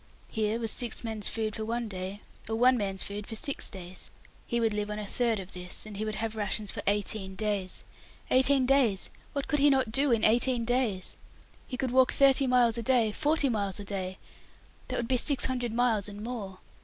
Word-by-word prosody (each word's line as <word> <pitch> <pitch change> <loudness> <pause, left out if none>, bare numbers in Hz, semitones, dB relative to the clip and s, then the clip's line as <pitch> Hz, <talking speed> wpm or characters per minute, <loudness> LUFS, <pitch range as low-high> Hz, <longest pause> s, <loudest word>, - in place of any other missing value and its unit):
Here 220 +1 0
was 225 -2 -1
six 240 -2 -1
men's 220 -3 -2
food 215 -1 -2
for 220 - -4
one 235 +1 -2
day, 190 +1 -5 0.3
or 225 - 0
one 250 +3 +5
man's 195 -4 0
food 205 +1 -6
for 225 - -6
six 275 +5 -3
days. 185 -2 -8 0.4
He 235 - 0
would 225 -2 +1
live 210 0 -2
on 210 - -3
a 210 - -4
third 230 +2 +1
of 190 0 -8
this, 180 +2 -6
and 215 -1 -8
he 210 - -3
would 215 -1 -2
have 220 +1 -3
rations 210 -1 -1
for - - -5
eighteen 200 -1 0
days. 205 -3 -2 0.5
Eighteen 260 +1 +4
days! 250 -8 +2 0.2
What 280 -1 -3
could 295 - +1
he 290 +1 +6
not 265 -5 +2
do 275 +3 +3
in 230 -2 +2
eighteen 240 +1 +3
days? 235 -6 0 0.5
He 255 - -5
could 255 -1 -1
walk 260 0 +5
thirty 275 -1 +4
miles 240 -2 +3
a - - -1
day 230 -2 +3
forty 295 +4 +2
miles 205 -5 0
a 205 - -6
day 190 -1 -4 0.7
that - - -3
would 235 - -2
be 255 - +2
six 275 +2 +2
hundred 250 -3 -2
miles 225 -4 +1
and 205 +1 -8
more. 215 -6 -5
225 Hz, 215 wpm, -29 LUFS, 205-250 Hz, 0.7 s, he